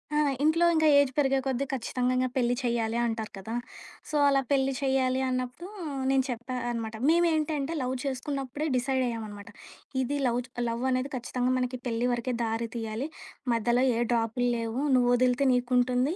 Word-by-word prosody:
ఆ! -, -, +3 dB, 0.2 s
ఇంట్లో 325 Hz, +3 st, +4 dB
ఇంక 315 Hz, 0 st, +3 dB
ఏజ్ 285 Hz, -2 st, +3 dB
పెరిగే 270 Hz, -2 st, +3 dB
కొద్దీ 265 Hz, 0 st, 0 dB
ఖచ్చితంగింకా 255 Hz, 0 st, 0 dB
పెళ్లి 245 Hz, -1 st, +2 dB
చెయ్యాలి 235 Hz, -2 st, 0 dB
అంటారు 225 Hz, -2 st, -3 dB
కదా! 195 Hz, +4 st, -6 dB, 0.6 s
సో, 305 Hz, -, -4 dB
అలా 275 Hz, -1 st, +3 dB
పెళ్లి 270 Hz, -1 st, +3 dB
చెయ్యాలి 265 Hz, -1 st, +1 dB
అన్నప్పుడూ, 255 Hz, +6 st, -3 dB, 0.4 s
నేను 270 Hz, -1 st, +3 dB
చెప్పా 245 Hz, +1 st, -4 dB, 0.2 s
అనమాట 225 Hz, -2 st, -4 dB
మేవేంటంటే, 315 Hz, -3 st, +2 dB
లవ్ 255 Hz, 0 st, -1 dB
చేసుకున్నప్పుడే 275 Hz, +1 st, -3 dB
డిసైడయ్యామనమాట. 235 Hz, -6 st, -2 dB, 0.5 s
ఇది 275 Hz, +3 st, -1 dB
లవు 240 Hz, 0 st, +1 dB
చ్ -, -, -36 dB, 0.2 s
లవ్వనేది 255 Hz, +3 st, -1 dB
ఖచ్చితంగా 250 Hz, +1 st, -1 dB
మనకి 250 Hz, 0 st, -2 dB
పెళ్లి 235 Hz, +1 st, 0 dB
వరకే, 240 Hz, +1 st, -2 dB
దారి 225 Hz, +1 st, -1 dB
తియ్యాలి, 225 Hz, +3 st, -3 dB, 0.5 s
మధ్యలో 240 Hz, +2 st, +2 dB
ఏ -, -, 0 dB
డ్రాపుల్లేవు, 235 Hz, +1 st, 0 dB, 0.2 s
నువ్వొదిలితే 250 Hz, +2 st, +3 dB
నీకుంటుంది 250 Hz, +4 st, +2 dB
250 Hz, 140 wpm, -28 LUFS, 235-270 Hz, 0.6 s, ఇంట్లో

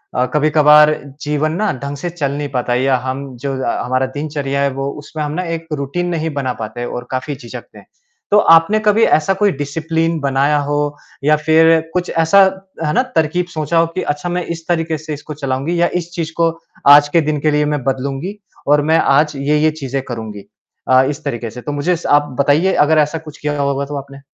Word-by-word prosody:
अ, 125 Hz, -, +2 dB
कभी-कभार 150 Hz, 0 st, +5 dB, 0.3 s
जीवन 150 Hz, +1 st, -1 dB
ना 205 Hz, +4 st, 0 dB
ढंग 140 Hz, +1 st, -4 dB
से 175 Hz, +5 st, -4 dB
चल 150 Hz, -5 st, -2 dB
नहीं 145 Hz, 0 st, -4 dB
पाता 125 Hz, -1 st, -1 dB
या 130 Hz, +1 st, +2 dB
हम 135 Hz, +2 st, -3 dB
जो 135 Hz, +2 st, -4 dB
अ, -, -, -1 dB
हमारा 130 Hz, +1 st, 0 dB
दिनचर्या 145 Hz, -2 st, -2 dB
है 140 Hz, -, +2 dB
वो 135 Hz, +1 st, -3 dB
उसमें 155 Hz, 0 st, -5 dB
हम 145 Hz, -, -3 dB
ना 180 Hz, +4 st, -2 dB
एक 165 Hz, 0 st, -9 dB
रूटीन 150 Hz, +5 st, -2 dB
नहीं 160 Hz, 0 st, -2 dB
बना 130 Hz, -3 st, -2 dB
पाते 110 Hz, +3 st, -5 dB
और 125 Hz, 0 st, -6 dB
काफ़ी 130 Hz, +3 st, -3 dB
झिझकते 120 Hz, -3 st, -11 dB
हैं। -, -, -18 dB, 0.5 s
तो 205 Hz, -, +6 dB, 0.2 s
आपने 165 Hz, +7 st, +4 dB
कभी 215 Hz, +2 st, +4 dB
ऐसा 155 Hz, +5 st, +1 dB
कोई 205 Hz, -1 st, +3 dB
डिसिप्लिन 160 Hz, +3 st, -1 dB
बनाया 140 Hz, +1 st, +1 dB
हो 145 Hz, -, 0 dB, 0.5 s
या 150 Hz, +1 st, +4 dB
फिर 160 Hz, +1 st, +4 dB
कुछ 180 Hz, 0 st, -1 dB
ऐसा, 165 Hz, +4 st, +3 dB, 0.5 s
है 150 Hz, -, 0 dB
ना, 255 Hz, -, +3 dB
तरकीब 160 Hz, +3 st, +1 dB
सोचा 155 Hz, +2 st, -1 dB
हो 165 Hz, -, +3 dB
कि 185 Hz, -, -1 dB
अच्छा 150 Hz, +4 st, -6 dB
मैं 180 Hz, 0 st, -2 dB
इस 165 Hz, 0 st, -14 dB
तरीक़े 165 Hz, -2 st, 0 dB
से 155 Hz, 0 st, -6 dB
इसको 150 Hz, +1 st, -7 dB
चलाऊँगी 140 Hz, +4 st, -2 dB
या 175 Hz, -, +4 dB
इस 170 Hz, -, -12 dB
चीज़ 165 Hz, -2 st, -3 dB
को 165 Hz, 0 st, +3 dB, 0.5 s
आज 145 Hz, 0 st, +5 dB
के 165 Hz, -, +6 dB
दिन 150 Hz, -, -1 dB
के 155 Hz, 0 st, +2 dB
लिए 150 Hz, 0 st, +2 dB
मैं 140 Hz, -, -4 dB
बदलूँगी 135 Hz, +9 st, -3 dB, 0.3 s
और 145 Hz, +1 st, +4 dB
मैं 165 Hz, -, +5 dB
आज 150 Hz, +2 st, +2 dB
ये-ये 150 Hz, +3 st, +1 dB
चीज़ें 135 Hz, 0 st, -2 dB
करूँगी 110 Hz, -4 st, -6 dB, 0.4 s
अ, 130 Hz, 0 st, +5 dB
इस 150 Hz, +2 st, -6 dB
तरीक़े 120 Hz, -4 st, -3 dB
से, 125 Hz, +3 st, -9 dB
तो 145 Hz, -, -5 dB
मुझे 145 Hz, +5 st, 0 dB
स 165 Hz, -, -9 dB
आप 145 Hz, -, -7 dB
बताइए 155 Hz, +7 st, +2 dB
अगर 160 Hz, +1 st, +2 dB
ऐसा 150 Hz, +2 st, +1 dB
कुछ 155 Hz, -2 st, -11 dB
किया 145 Hz, -1 st, -2 dB
होगा 140 Hz, 0 st, -1 dB
तो 145 Hz, +1 st, -5 dB
आपने? 140 Hz, 0 st, -9 dB
150 Hz, 215 wpm, -17 LUFS, 140-165 Hz, 0.5 s, तो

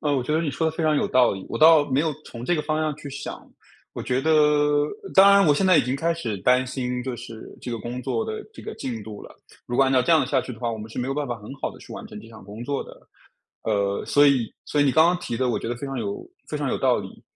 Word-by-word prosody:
呃， 145 Hz, -2 st, 0 dB
我 130 Hz, -, 0 dB
觉 150 Hz, -, -3 dB
得 160 Hz, -, +2 dB
你 150 Hz, -, -1 dB
说 160 Hz, +4 st, 0 dB
得 -, -, -2 dB
非 165 Hz, -, -1 dB
常 155 Hz, -1 st, +3 dB
有 -, -, +1 dB
道 125 Hz, -3 st, +4 dB
理， 95 Hz, -1 st, -7 dB
我 -, -, -4 dB
倒 155 Hz, -1 st, +7 dB
没 130 Hz, -, +2 dB
有 160 Hz, -1 st, 0 dB
从 120 Hz, 0 st, -9 dB
这 175 Hz, -, +1 dB
个 150 Hz, -, -1 dB
方 155 Hz, +1 st, -1 dB
向 155 Hz, -1 st, -1 dB
去 145 Hz, -2 st, -9 dB
想。 140 Hz, +1 st, -7 dB, 0.4 s
我 -, -, -6 dB
觉 130 Hz, +1 st, 0 dB
得 160 Hz, -, 0 dB
呃， 150 Hz, -1 st, +3 dB, 0.2 s
当 195 Hz, +1 st, +8 dB
然 200 Hz, -3 st, +6 dB
我 145 Hz, -, +5 dB
现 190 Hz, +6 st, +1 dB
在 185 Hz, -3 st, +6 dB
已 -, -, +4 dB
经 125 Hz, +3 st, -2 dB
开 165 Hz, +4 st, 0 dB
始 115 Hz, -11 st, -4 dB
担 125 Hz, +6 st, +3 dB
心 125 Hz, -1 st, -3 dB
就 130 Hz, -2 st, -4 dB
是 115 Hz, -1 st, -10 dB
这 125 Hz, -, -5 dB
个 115 Hz, -, -3 dB
工 120 Hz, +4 st, -5 dB
作 450 Hz, -, -1 dB
的 435 Hz, -1 st, -5 dB
这 -, -, -12 dB
个 440 Hz, -, -7 dB
进 115 Hz, -5 st, -5 dB
度 105 Hz, -1 st, -9 dB
了。 -, -, -12 dB, 0.3 s
如 120 Hz, -, -4 dB
果 135 Hz, -, +5 dB
按 130 Hz, -, +1 dB
照 130 Hz, -1 st, +4 dB
这 165 Hz, -, +2 dB
样 155 Hz, -4 st, +5 dB
下 140 Hz, -1 st, +1 dB
去 125 Hz, -, -7 dB
的 115 Hz, -, -12 dB
话， 120 Hz, -1 st, -1 dB
我 110 Hz, -, -4 dB
们 105 Hz, -, -8 dB
是 -, -, -7 dB
没 125 Hz, +2 st, -2 dB
有 135 Hz, -, -1 dB
办 145 Hz, -1 st, -2 dB
法 120 Hz, -, -3 dB
很 105 Hz, -, -11 dB
好 -, -, -4 dB
地 -, -, -14 dB
去 -, -, -12 dB
完 -, -, -8 dB
成 -, -, -10 dB
这 115 Hz, -, -14 dB
项 110 Hz, -2 st, -13 dB
工 105 Hz, +4 st, -9 dB
作 140 Hz, +2 st, -3 dB
的。 -, -, -12 dB, 0.7 s
呃， 100 Hz, -2 st, -1 dB
所 145 Hz, 0 st, +4 dB
以 130 Hz, -5 st, +2 dB
所 145 Hz, -, 0 dB
以 -, -, +4 dB
你 135 Hz, -, +3 dB
刚 160 Hz, +1 st, +6 dB
刚 180 Hz, +1 st, +2 dB
提 120 Hz, -9 st, -4 dB
的 130 Hz, 0 st, 0 dB
我 120 Hz, -, 0 dB
觉 -, -, -6 dB
得 120 Hz, -, -2 dB
非 140 Hz, -, -6 dB
常 135 Hz, -2 st, -4 dB
有 200 Hz, -, -5 dB, 0.2 s
非 -, -, -3 dB
常 -, -, -2 dB
有 -, -, 0 dB
道 -, -, +2 dB
理。 -, -, -9 dB
135 Hz, 340 characters per minute, -24 LUFS, 120-155 Hz, 0.7 s, 当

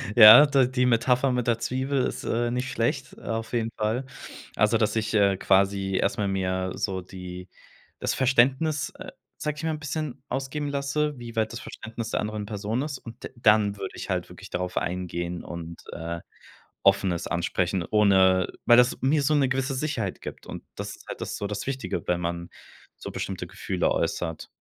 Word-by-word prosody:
Ja, 115 Hz, +5 st, +11 dB
da 140 Hz, -3 st, +4 dB
die 125 Hz, 0 st, +1 dB
Metapher 125 Hz, +2 st, +3 dB
mit 125 Hz, -1 st, -1 dB
der 115 Hz, -1 st, +2 dB
Zwiebel 130 Hz, +2 st, 0 dB
ist, -, -, -4 dB
äh, 120 Hz, +1 st, 0 dB
nicht 125 Hz, +2 st, -2 dB
schlecht. 135 Hz, +4 st, -1 dB
Auf 115 Hz, 0 st, -4 dB
jeden 115 Hz, -1 st, 0 dB
Fall. 110 Hz, +5 st, -1 dB, 0.5 s
Also 105 Hz, +2 st, +3 dB
dass 110 Hz, -1 st, +1 dB
ich, 110 Hz, -1 st, -1 dB
äh, 100 Hz, -2 st, +4 dB
quasi 95 Hz, 0 st, +2 dB
erstmal 105 Hz, -4 st, 0 dB
mir 95 Hz, -1 st, -1 dB
so 95 Hz, -2 st, -2 dB
die 90 Hz, 0 st, -9 dB, 0.5 s
das -, -, 0 dB
Verständnis, 135 Hz, +4 st, +2 dB
äh, -, -, -8 dB, 0.3 s
sag 150 Hz, -1 st, -2 dB
ich 150 Hz, -, -7 dB
mal, 160 Hz, -, 0 dB
'n -, -, -9 dB
bisschen 150 Hz, -1 st, -4 dB
ausgeben 135 Hz, +2 st, -3 dB
lasse, 145 Hz, +1 st, -1 dB
wie 120 Hz, -1 st, -8 dB
weit 110 Hz, -1 st, 0 dB
das 115 Hz, -, -5 dB
Verständnis 115 Hz, 0 st, -7 dB
der -, -, 0 dB
anderen 105 Hz, 0 st, -3 dB
Person 105 Hz, +3 st, -2 dB
ist. 145 Hz, -2 st, -3 dB
Und 115 Hz, +1 st, -12 dB
d -, -, -5 dB
dann 105 Hz, -3 st, +3 dB
würd 95 Hz, -1 st, -5 dB
ich -, -, -7 dB
halt -, -, -1 dB
wirklich -, -, -12 dB
darauf 90 Hz, 0 st, -3 dB
eingehen 85 Hz, -1 st, -3 dB
und, 85 Hz, -1 st, -8 dB
äh, 85 Hz, +1 st, -4 dB, 0.6 s
offen 95 Hz, -, +4 dB
es 85 Hz, -1 st, -3 dB
ansprechen, 85 Hz, +1 st, 0 dB
ohne 95 Hz, -3 st, +4 dB, 0.2 s
weil 120 Hz, -, +7 dB
das 125 Hz, 0 st, +4 dB
mir 145 Hz, +3 st, +3 dB
so 150 Hz, +2 st, +3 dB
'ne 140 Hz, -2 st, +3 dB
gewisse 135 Hz, +1 st, -1 dB
Sicherheit 130 Hz, -9 st, -2 dB
gibt. -, -, -8 dB
Und -, -, -7 dB
das -, -, -5 dB
ist -, -, -19 dB
halt -, -, -6 dB
das -, -, -4 dB
so -, -, -4 dB
das 105 Hz, +3 st, -5 dB
Wichtige, 135 Hz, -1 st, -3 dB
wenn 90 Hz, 0 st, +1 dB
man 85 Hz, 0 st, -3 dB, 0.5 s
so -, -, -7 dB
bestimmte -, -, -4 dB
Gefühle -, -, -1 dB
äußert. 80 Hz, -2 st, -2 dB
115 Hz, 190 wpm, -26 LUFS, 95-130 Hz, 0.6 s, Ja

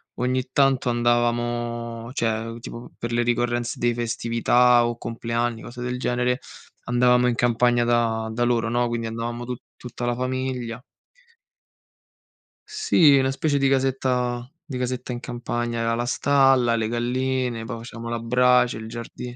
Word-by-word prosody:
ogni 130 Hz, +1 st, 0 dB
tanto 135 Hz, -3 st, +3 dB
andavamo, 120 Hz, -1 st, -1 dB
cioè 115 Hz, -1 st, -2 dB
tipo 120 Hz, +1 st, -9 dB
per 120 Hz, -, -4 dB
le 120 Hz, 0 st, +1 dB
ricorrenze 120 Hz, 0 st, 0 dB
di 120 Hz, 0 st, +1 dB
festività 120 Hz, +1 st, +3 dB
o 120 Hz, -, -3 dB
compleanni, 115 Hz, 0 st, -2 dB
cose 120 Hz, +1 st, -8 dB
del 125 Hz, 0 st, -3 dB
genere, 125 Hz, 0 st, 0 dB, 0.5 s
andavamo 125 Hz, 0 st, +3 dB
in 120 Hz, -, +1 dB
campagna 120 Hz, 0 st, +2 dB
da 115 Hz, -2 st, +1 dB
da 120 Hz, -, -3 dB
loro, 120 Hz, -1 st, +1 dB
no, 120 Hz, +1 st, +1 dB
quindi 120 Hz, -1 st, -3 dB
andavamo 115 Hz, +1 st, -4 dB
tu 125 Hz, 0 st, -4 dB, 0.2 s
tutta 120 Hz, 0 st, -7 dB
la 120 Hz, -, 0 dB
famiglia. 130 Hz, -2 st, -3 dB, 1.9 s
Sì, 425 Hz, -, +4 dB
una 135 Hz, 0 st, +2 dB
specie 145 Hz, +1 st, 0 dB
di 135 Hz, -1 st, +2 dB
casetta 130 Hz, -2 st, 0 dB, 0.2 s
di 140 Hz, -6 st, -6 dB
casetta 125 Hz, 0 st, -3 dB
in 120 Hz, -, -4 dB
campagna, 120 Hz, -1 st, -3 dB
aveva 115 Hz, 0 st, 0 dB
la 120 Hz, -, -1 dB
stalla, 135 Hz, -2 st, +3 dB
le 110 Hz, -1 st, 0 dB
galline, 125 Hz, 0 st, -1 dB
poi 115 Hz, 0 st, -5 dB
facevamo 115 Hz, 0 st, -8 dB
la 115 Hz, 0 st, -2 dB
brace, 125 Hz, 0 st, +3 dB
il 110 Hz, -, -7 dB
giardino. 120 Hz, +1 st, -7 dB
120 Hz, 150 wpm, -24 LUFS, 115-125 Hz, 1.9 s, Sì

